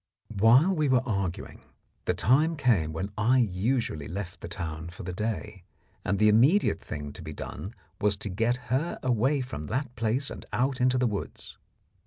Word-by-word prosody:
While 125 - +5
we 155 -3 +1
were 130 -1 +4
arguing, 100 -6 -3 0.4
the - - +1
time 150 - +3
came 110 - +2
when 95 +6 -4
I 120 +5 +4
usually 110 - 0
left 90 -1 -6
the - - -6
town 80 -1 -5
for 85 - -10
the 90 0 -4
day, 105 0 -3 0.4
and 100 - 0
the 105 - +4
immediate 120 - +4
thing 75 -1 -6
to - - -9
be 80 -1 -7
done 100 +8 -7 0.2
was 105 -1 +1
to 105 - -4
get 115 +6 +1 0.2
her 150 +7 0
away 130 +3 +2
from 120 - -6
that 125 0 -3
place 115 +4 -1
and - - -7
out 130 +1 0
into 130 0 +3
the 125 - +2
woods. 105 -4 -5
110 Hz, 180 wpm, -28 LUFS, 95-130 Hz, 0.4 s, While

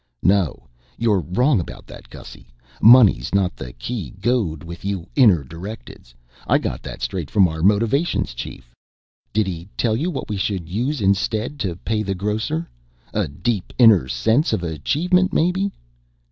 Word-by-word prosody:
"No, 95 -5 +1 0.3
you're 110 -4 +2
wrong 120 - +1
about 85 - -7
that, - - -13
Gussy. - - -12 0.3
Money's 110 - +6
not 95 -2 +1
the - - -8
key 110 - -5
goad 100 - 0
with 85 +1 -9
you 95 -4 -3
inner 105 - +5
directeds. 80 - -10 0.3
I - - +4
got - - -4
that - - -8
straight 70 +6 -3
from 100 -4 +4
our 80 -1 -5
Motivations 105 - +1
chief." - - -9 0.6
"Did 110 0 +1
he 90 0 -6
tell 110 -3 +1
you 155 +10 -1
what 140 -7 -5
we 105 - -3
should 95 -3 -2
use 120 - -2
instead 110 +7 0
to 95 -7 -2
pay 105 +4 -2
the 100 -2 -2
grocer? 100 -4 -2 0.5
A - - 0
deep 95 +7 -3
inner 110 - +6
sense 110 - +1
of 90 - -1
achievement, 165 - +1
maybe? 190 +4 +1
100 Hz, 160 wpm, -21 LUFS, 85-120 Hz, 0.6 s, Money's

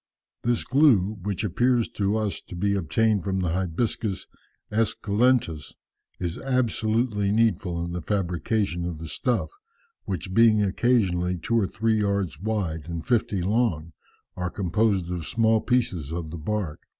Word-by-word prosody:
"This 120 -1 0
glue, 115 -8 +3
which 100 +1 -3
appears 120 +4 +2
to 100 +1 0
us 105 -2 -2
to - - -8
be 100 +3 +1
obtained 100 +3 +1
from 95 +1 -1
the 90 - 0
'Hibiscus 95 +4 -1 0.5
Esculentus,' 110 - +1 0.4
is 85 -1 -3
absolutely 110 -4 0
needful 95 -6 +1
in 85 - -5
the 90 0 -3
fabrication 90 0 -1
of 85 -2 -4
the 80 +1 -7
stuff, 125 - -1 0.5
which 95 0 -4
being 110 -1 +5
occasionally 95 -4 +1
two 115 +7 0
or 100 - +1
three 110 +2 0
yards 100 -6 -1
wide 95 -7 -2
and 85 -1 -5
fifty 105 -6 +1
long, 95 -6 0 0.4
are 90 0 -2
composed 95 -1 0
of 85 -3 -4
small 110 -1 +2
pieces 115 - 0
of 80 -2 -4
the 85 - -5
bark. 95 -2 -3
100 Hz, 145 wpm, -25 LUFS, 85-110 Hz, 0.5 s, being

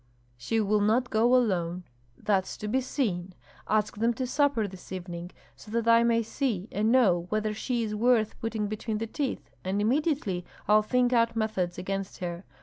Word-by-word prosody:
"She 120 - -1
will 210 0 +2
not 235 +4 +2
go 235 +3 +4
alone." 180 -7 +1 0.3
"That's 195 -3 0
to 210 - -5
be 260 +5 +1
seen. 190 -9 -2 0.3
Ask 215 -1 +1
them 230 +2 +1
to 255 - -2
supper 275 -4 +1
this 185 -1 -12
evening, 175 -2 -6 0.3
so - - -14
that 230 +1 -1
I 230 0 +6
may 230 0 +3
see 220 -5 -2
and 215 +3 +1
know 185 -9 +4
whether 215 +1 0
she 235 +2 -1
is 215 -1 -3
worth 220 0 +2
putting 225 -2 -2
between 215 +1 -3
the 225 - -2
teeth, 270 +4 -4
and 190 +2 -1
immediately 235 - 0 0.2
I'll 215 +1 +6
think 250 +3 +1
out 230 -1 +3
methods 210 -6 -1
against 195 +2 -4
her. 175 0 -5
215 Hz, 180 wpm, -28 LUFS, 190-235 Hz, 0.3 s, I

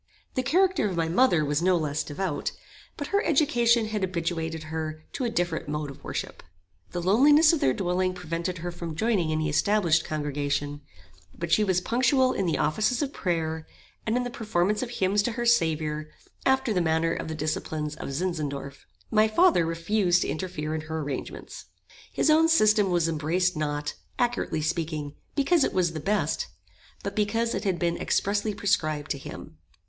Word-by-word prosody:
The 255 - 0
character 350 - +2
of 185 - -4
my 165 -1 +1
mother 175 -3 +3
was 145 +2 0
no 180 0 +3
less 155 -1 -1
devout; 155 +1 -3 0.4
but 290 - -5
her 405 +1 +2
education 240 -7 +3
had 215 -2 -2
habituated 165 -3 -2
her 155 0 -5
to 260 - -2
a - - +1
different 175 -9 -1
mode 150 -1 -3
of 135 - -15
worship. - - -5 0.5
The 175 -1 -4
loneliness 290 - +6
of 325 - +1
their 130 - +3
dwelling 185 0 0
prevented 170 +1 -3
her 175 +1 -4
from 170 -2 -6
joining 190 -4 +1
any 155 0 0
established 165 0 +2
congregation; 145 -1 -2 0.6
but 170 -1 -4
she 215 - +5
was 185 -3 +1
punctual 255 +4 +2
in 195 - -1
the 165 - +1
offices 215 - +1
of 280 - -4
prayer, 160 -3 -2 0.4
and 225 +2 +2
in 250 - 0
the 245 - -4
performance 210 -3 0
of 255 - -3
hymns 200 -3 +1
to 230 +3 -1
her 240 +1 -3
Saviour, 155 -8 +1 0.4
after 265 -3 +2
the 180 - +1
manner 165 0 +1
of - - -4
the 160 - -4
disciples 155 0 -3
of - - -6
Zinzendorf. 140 -4 -4 0.2
My 215 0 +5
father 220 - +4
refused 175 +2 +1
to - - -3
interfere 155 -3 -3
in 160 - -2
her 160 +1 -4
arrangements. 140 -2 -6 0.5
His - - +2
own 320 +1 +5
system 215 - +4
was 175 -2 +2
embraced 165 +3 0
not, 150 -1 -2 0.2
accurately 240 -10 0
speaking, 155 -2 -2 0.2
because 290 +2 +3
it - - 0
was 175 -3 +1
the 160 - -4
best, 205 +7 0 0.6
but - - -4
because 225 +3 0
it 195 +3 -3
had 190 -3 +1
been 170 0 0
expressly 205 +1 0
prescribed 155 -7 0
to 140 - -2
him. - - -10
175 Hz, 180 wpm, -26 LUFS, 155-220 Hz, 0.6 s, loneliness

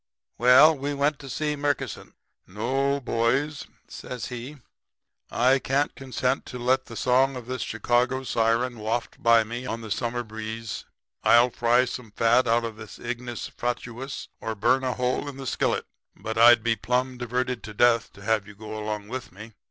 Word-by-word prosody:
"Well, 130 +6 +7
we 140 +1 -3
went 145 +1 +1
to 135 - -10
see 150 +3 -1
Murkison. 145 0 -3 0.3
"'No, 135 +8 0
boys,' 135 +4 0 0.2
says 125 -3 -7
he. 125 +4 -7 0.7
'I 130 +3 +3
can't 140 +3 0
consent 130 -1 -2
to 125 - -7
let 130 +2 +1
the 115 - -9
song 130 +3 +2
of 125 -2 -7
this 130 -1 -4
Chicago 120 +4 0
siren 115 0 0
waft 110 +3 -3
by 115 -1 +5
me 120 +3 -6
on 115 -1 -4
the 110 -2 -8
summer 120 +2 -1
breeze. 110 0 -6 0.4
I'll 120 +1 +6
fry 120 +2 +3
some 125 -2 -7
fat 115 +4 +3
out 115 +1 +3
of 110 -2 -6
this 110 -1 -10
ignis 120 -1 -5
fatuus 120 +2 -4
or 110 - -4
burn 130 +6 +2
a 130 -1 0
hole 125 +3 -1
in 135 - -9
the 135 - -7
skillet. - - 0 0.3
But 110 0 -5
I'd 115 0 +7
be 115 -1 +2
plumb 125 +2 -1
diverted 125 0 -2
to 105 - -8
death 120 0 +3
to 100 - -14
have 110 -1 +1
you 100 - -12
all 110 +1 -10
go 110 - -4
along 105 -1 -4
with 125 +2 -6
me. 105 +4 -11
120 Hz, 180 wpm, -26 LUFS, 115-130 Hz, 0.7 s, Well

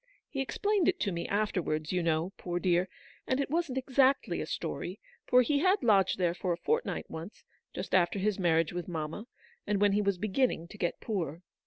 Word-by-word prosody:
He 270 - -2
explained 405 - +1
it 370 -1 +2
to 200 - +1
me 170 -1 -3
after 205 -2 0
wards, 155 -1 -2
you 180 -1 +1
know, 165 +3 0
poor 175 -1 -3
dear; 180 0 +2 0.4
and 260 - +1
it 280 - -1
wasn't 325 -5 0
exactly 265 +1 +2
a - - -4
story, - - -4 0.3
for 250 0 +6
he 285 +4 +1
had 370 +1 +3
lodged 200 -5 +4
there 175 -2 +1
for 180 0 -2
a - - -4
fortnight 465 - -1
once, 165 +6 -8 0.3
just 185 - -5
after 185 +1 +3
his 200 +1 0
marriage 165 -2 +2
with 175 -1 -4
mamma, 165 +6 -4 0.4
and 205 -1 +1
when 205 0 +4
he 205 +1 +2
was 200 -2 +1
beginning 205 -2 0
to 210 - -11
get 175 -1 -1
poor. 175 -6 -3
195 Hz, 205 wpm, -30 LUFS, 175-255 Hz, 0.4 s, for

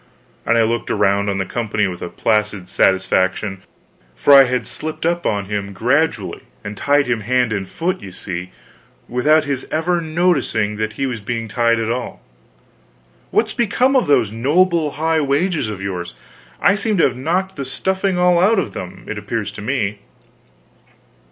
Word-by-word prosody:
_" - - -4
and 115 - +4
I 115 - +5
looked 115 +1 -1
around 100 +1 +2
on 100 - -1
the 95 - -1
company 105 -1 -1
with 90 -2 -4 0.2
placid 105 -4 0
satisfaction, 95 +1 +1 0.5
for 145 - +4
I 135 -1 +9
had 125 -2 -1
slipped 155 +1 -5
up 170 +1 0
on 100 -2 -1
him 100 0 -4
gradually 120 - 0 0.2
and 105 +1 -6
tied 145 +6 +2
him 125 -2 0
hand 125 +1 +1
and 95 -2 -3
foot, 175 - -2
you 95 -2 -9
see, 90 -1 -5 0.6
without 150 +6 +3
his 140 -2 -3
ever 170 +2 0
noticing 155 - 0
that 110 0 -2
he 135 - -2
was 120 -4 -3
being 115 +2 -3
tied 115 0 +2
at 115 0 -1
all. 125 +1 -4 1.1
"What's - - +1
become 250 +4 +2
of 255 - +3
those 110 -7 +3
noble 155 +6 +2
high 160 +1 +1
wages 145 - 0
of 100 -2 -6
yours? 90 -2 -4 0.4
I 200 - +4
seem 210 0 -1
to 165 - +4
have 130 - +2
knocked 180 +8 -1
the 140 - -4
stuffing 190 +7 -1
all 180 -1 +4
out 210 +5 +4
of 185 - -1
them, 90 -1 -8
it - - -4
appears - - -3
to - - -9
me." 110 -3 -1
125 Hz, 175 wpm, -19 LUFS, 105-160 Hz, 1.1 s, I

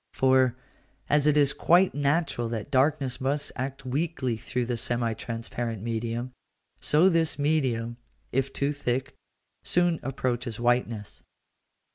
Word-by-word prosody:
For, 130 -2 +4 0.5
as 150 0 +3
it 150 0 +4
is 140 -2 +4
quite 180 +3 +4
natural 145 -4 0
that 115 +3 -5
darkness 135 -1 +1
must 140 +2 0
act 135 +1 -5
weakly 130 -2 -1
through 125 +3 -3
the 120 0 -2
semi 120 0 0
transparent 115 -1 -5
medium, 115 +2 -3 0.5
so 155 +5 +4
this 165 -3 +2
medium, 130 -6 0 0.3
if 135 +1 0
too 140 +1 0
thick, 135 -1 -2 0.5
soon 175 -2 +2
approaches 125 -3 -2
whiteness. 120 -3 0
130 Hz, 125 wpm, -27 LUFS, 120-145 Hz, 0.5 s, For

